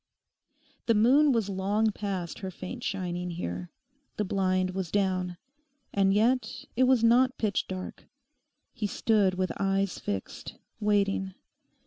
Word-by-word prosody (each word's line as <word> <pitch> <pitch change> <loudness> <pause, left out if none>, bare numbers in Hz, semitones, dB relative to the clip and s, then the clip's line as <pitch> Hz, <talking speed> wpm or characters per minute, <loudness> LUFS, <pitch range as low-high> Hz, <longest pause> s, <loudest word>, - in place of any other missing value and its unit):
The 230 - +4
moon 270 +7 +5
was 230 -5 +1
long 205 +3 +1
past 195 -5 -4
her 190 - -4
faint 185 +6 -7
shining 180 -2 -3
here. 90 - -5 0.5
The 210 - 0
blind 185 -1 +1
was 185 -2 -3
down. 185 -3 0 0.6
And 195 -1 +3
yet 235 +6 +1
it 255 +2 +4
was 255 -3 +4
not 250 +3 +4
pitch 210 -3 0
dark. 185 -1 -7 0.7
He 210 - -2
stood 205 -3 +2
with 185 0 -1
eyes 195 -1 0
fixed, 100 -1 -5 0.2
waiting. 200 -2 +1
195 Hz, 130 wpm, -28 LUFS, 185-220 Hz, 0.7 s, moon